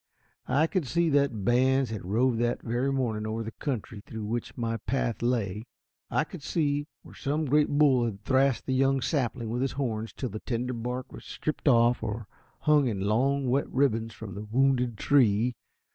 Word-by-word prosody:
I 150 +3 +3
could 165 -3 -1
see 170 +5 +2
that 140 -8 +1
bands 130 +1 +3
had 110 - -5
roved 115 +6 +1
that 120 0 0
very 120 +4 0
morning 115 -5 -1
over 110 +1 -2
the 110 - -6
country 115 -6 -4
through 110 -1 -6
which 115 +2 -4
my 115 -1 -1
path 120 +1 -2
lay. 115 -3 -1 0.4
I - - +2
could - - -10
see 145 -1 0 0.2
where - - -14
some 150 +3 -1
great 150 +2 +3
bull 140 -4 +4
had 100 -3 -5
thrashed 130 +1 +2
the 130 - -1
young 135 +1 +2
sapling 120 -6 -1
with 120 +2 -1
his 135 - 0
horns 115 -5 -2
till 130 - -4
the 110 - -6
tender 125 +1 -2
bark 125 +2 -4
was - - -10
stripped 155 0 -4
off, 120 -2 +4
or 110 +1 -4 0.4
hung 150 -3 +4
in 100 -5 -2
long, 130 +7 +1
wet 135 +3 +1
ribbons 115 -4 +1
from 105 -4 -8
the 100 - -6
wounded 125 -1 +2
tree. 120 -3 +3
125 Hz, 190 wpm, -28 LUFS, 115-135 Hz, 0.4 s, bull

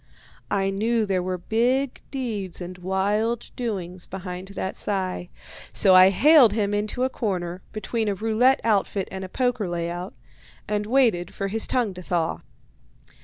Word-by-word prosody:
I 195 -1 +1
knew 220 +3 +1
there 190 -2 0
were 185 0 -2
big 245 +8 0
deeds 220 -9 -4
and 180 0 -7
wild 205 +5 -1
doings 185 -7 -4
behind 185 0 -6
that 190 - -3
sigh, 185 -3 -3 0.4
so 190 -2 +5
I 185 +1 +9
haled 265 - +6
him 205 -2 0
into 210 +4 -1
a - - +3
corner, 185 -7 -3
between 220 +1 -2
a 200 - 0
roulette 225 +6 +2
outfit 200 -3 +1
and 190 0 -5
a 185 - -7
poker 245 -4 -1
layout, 175 +2 -4 0.5
and 210 0 -1
waited 225 -9 +2
for 195 0 -2
his 220 +2 +2
tongue 240 -6 0
to 180 - -9
thaw. 170 -2 -1
200 Hz, 155 wpm, -24 LUFS, 185-225 Hz, 0.5 s, I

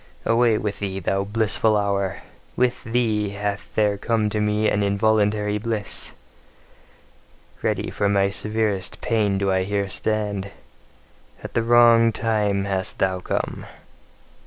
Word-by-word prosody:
Away 115 -1 +3
with 105 -1 -3
thee, 95 -2 -3
thou 95 +2 0
blissful 110 +1 +2
hour! 100 -2 -1 0.3
With 125 -1 0
thee 110 -3 0
hath 100 0 -4
there 105 -2 +2
come 110 -1 0
to 105 - -1
me 105 +1 +1
an 105 - +1
involuntary 105 0 +1
bliss! 110 -2 -3 1.5
Ready - - -1
for 100 -1 0
my 100 -1 +2
severest 105 -2 -1
pain 105 -4 +1
do 100 0 0
I 95 0 +2
here 100 +1 -1
stand: 105 -1 -2 0.9
at - - -7
the 115 - +2
wrong 115 0 +5
time 105 -3 0
hast 95 -1 -2
thou 95 -1 0
come! - - -3
105 Hz, 135 wpm, -23 LUFS, 100-110 Hz, 1.5 s, wrong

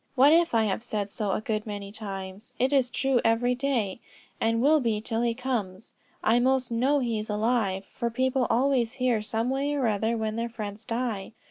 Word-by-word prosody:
What 275 +4 +6
if 335 -5 +3
I 225 - +4
have 215 +1 -1
said 205 -4 -3
so 210 -2 -2
a - - -1
good 215 0 -2
many 200 -1 -5
times, 200 +1 -7
it 260 +3 +1
is 260 -3 +3
true 265 -1 +1
every 230 +2 +2
day, 245 -7 -1 0.4
and 225 0 +1
will 300 +5 +5
be 230 -5 0
till 225 +1 -2
he 235 -1 +1
comes. 225 -5 -3 0.3
I 230 +2 +4
most 255 0 +1
know 260 +5 +2
he 235 -5 -1
is 215 - -6
alive, 210 -3 0
for 235 -2 -3
people 260 +1 +1
always 250 -1 +2
hear, 250 -4 +1
some 225 +3 -1
way 280 +2 0
or 275 -3 0
other, 220 +1 +1
when 220 0 -2
their 235 +1 -2
friends 215 -1 -7
die. 230 -4 -3
230 Hz, 205 wpm, -27 LUFS, 215-255 Hz, 0.4 s, What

